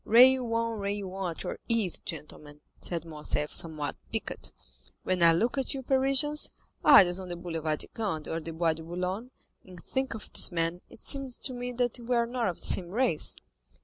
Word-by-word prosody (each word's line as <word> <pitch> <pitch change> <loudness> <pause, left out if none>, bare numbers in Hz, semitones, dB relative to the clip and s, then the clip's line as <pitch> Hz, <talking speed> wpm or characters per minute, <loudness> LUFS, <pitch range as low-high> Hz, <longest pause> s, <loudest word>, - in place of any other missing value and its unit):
"Rail 250 +1 +6
on, 230 -1 -1
rail 200 -1 -3
on 190 -2 -3
at 165 - -6
your - - -5
ease, 225 -7 +1
gentlemen," 150 -1 -8 0.2
said 170 -2 -3
Morcerf, 150 -1 -1
somewhat 155 -4 +1 0.2
piqued. - - -4 0.5
"When 185 -1 0
I 170 -1 +7
look 230 +11 +1
at 270 +1 -1
you 265 - -5
Parisians, 275 +3 +2 0.3
idlers 185 -10 +7
on 185 -1 -7
the 175 - -4
Boulevard 165 -3 -3
de - - -5
Gand 195 -9 -3
or 165 - -2
the 165 0 -7
Bois 165 0 +1
de 160 - -9
Boulogne, 180 +7 -4 0.3
and 185 -2 -13
think 265 -2 -2
of 220 - -9
this - - +6
man, 165 +1 -1
it - - -15
seems 275 -3 +2
to 260 - -2
me 245 0 -5 0.2
we 240 +1 -1
are 235 0 +3
not 240 -1 -2
of 180 - -2
the - - -6
same 175 -2 +1
race." 225 -5 +2
190 Hz, 195 wpm, -29 LUFS, 165-245 Hz, 0.5 s, I